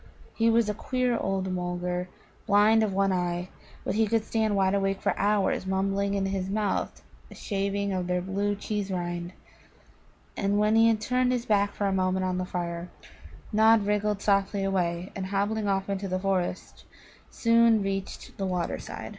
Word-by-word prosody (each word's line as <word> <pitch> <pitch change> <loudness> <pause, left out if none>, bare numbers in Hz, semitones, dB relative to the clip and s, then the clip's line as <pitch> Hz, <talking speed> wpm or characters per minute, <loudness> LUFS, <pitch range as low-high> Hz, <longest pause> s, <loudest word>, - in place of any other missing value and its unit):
He 230 0 +2
was 230 -1 +3
a 210 - 0
queer 250 +2 -1
old 195 -3 -1
Mulgar, 180 0 -3 0.4
blind 210 +2 +5
of 215 -2 +1
one 195 0 +1
eye, 175 0 -2 0.3
but - - -2
he 220 +1 +2
could 225 0 +1
stand 220 -2 0
wide 190 -1 +2
awake 195 -1 0
for - - 0
hours 200 -2 +1
mumbling 195 +1 0
in 195 -1 0
his 190 -1 -2
mouth 205 0 -2 0.3
a - - -12
shaving 200 0 -2
of 180 -1 -2
their 180 0 0
blue 200 +3 -1
cheese 205 0 -3
rind. 175 -1 -3 1.0
And 200 0 0
when 210 +1 +3
he 225 0 +6
had 220 -2 +2
turned 250 +2 +1
his 245 -1 -1
back 200 -1 +1
for 205 - -1
a 195 - +1
moment 185 0 +1
on 185 0 -1
the 185 - -2
fire, 175 -1 -4 0.6
Nod 220 0 +5
wriggled 210 0 0
softly 200 0 +1
away, 180 -2 -1
and, 190 -1 -4
hobbling 205 +2 -1
off 195 -1 0
into 200 0 -3
the 185 0 -1
forest, 185 -1 -2 0.5
soon 230 -2 +3
reached 195 0 -4
the 195 - -1
water 180 -2 -2
side. - - -7
195 Hz, 180 wpm, -27 LUFS, 185-210 Hz, 1.0 s, he